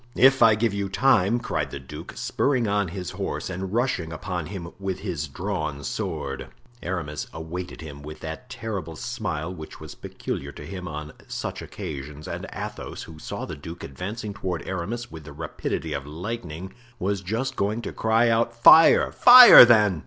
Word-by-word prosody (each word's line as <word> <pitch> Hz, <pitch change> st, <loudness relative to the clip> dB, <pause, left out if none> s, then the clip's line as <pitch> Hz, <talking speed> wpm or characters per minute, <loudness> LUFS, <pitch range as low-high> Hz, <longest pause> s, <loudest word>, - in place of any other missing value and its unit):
"If 135 Hz, +1 st, +5 dB
I 110 Hz, -1 st, +7 dB
give 110 Hz, -1 st, 0 dB
you 100 Hz, -1 st, -2 dB
time!" 110 Hz, -1 st, +3 dB
cried 120 Hz, -, -2 dB
the -, -, -6 dB
duke, 75 Hz, +5 st, -10 dB
spurring 130 Hz, -5 st, 0 dB
on 100 Hz, -1 st, +1 dB
his 90 Hz, 0 st, -6 dB
horse -, -, -4 dB
and 95 Hz, +1 st, -5 dB
rushing 115 Hz, -8 st, -1 dB
upon 85 Hz, 0 st, -4 dB
him 90 Hz, -4 st, -7 dB
with 95 Hz, -2 st, -4 dB
his 85 Hz, -7 st, -3 dB
drawn 75 Hz, -2 st, -4 dB
sword. 65 Hz, -, -4 dB, 0.3 s
Aramis 75 Hz, -6 st, -4 dB
awaited 85 Hz, +3 st, -7 dB
him 70 Hz, -3 st, -9 dB
with 75 Hz, +1 st, -10 dB
that 80 Hz, +11 st, -7 dB
terrible 100 Hz, -10 st, -5 dB
smile 80 Hz, +3 st, -4 dB
which 80 Hz, -3 st, -10 dB
was -, -, -9 dB
peculiar 70 Hz, +1 st, -6 dB
to 75 Hz, -, -10 dB
him 90 Hz, +1 st, -7 dB
on 75 Hz, -1 st, -7 dB
such -, -, -5 dB
occasions, 75 Hz, +1 st, -7 dB
and -, -, -5 dB
Athos, -, -, -6 dB
who 80 Hz, -1 st, -12 dB
saw -, -, -5 dB
the -, -, -7 dB
duke 80 Hz, +4 st, -9 dB
advancing 100 Hz, -, -6 dB
toward 95 Hz, -4 st, -4 dB
Aramis 105 Hz, +7 st, -4 dB
with 80 Hz, -1 st, -9 dB
the 70 Hz, -1 st, -11 dB
rapidity 80 Hz, 0 st, -4 dB
of 70 Hz, 0 st, -5 dB
lightning, 90 Hz, +1 st, -6 dB, 0.2 s
was 100 Hz, -1 st, -1 dB
just 110 Hz, +8 st, -3 dB
going 105 Hz, +4 st, -1 dB
to -, -, -5 dB
cry 110 Hz, +1 st, +2 dB
out, 115 Hz, +1 st, +1 dB
"Fire! 160 Hz, +7 st, +7 dB
fire, 250 Hz, -, +11 dB
then!" 105 Hz, -7 st, +4 dB
90 Hz, 175 wpm, -25 LUFS, 80-110 Hz, 0.3 s, fire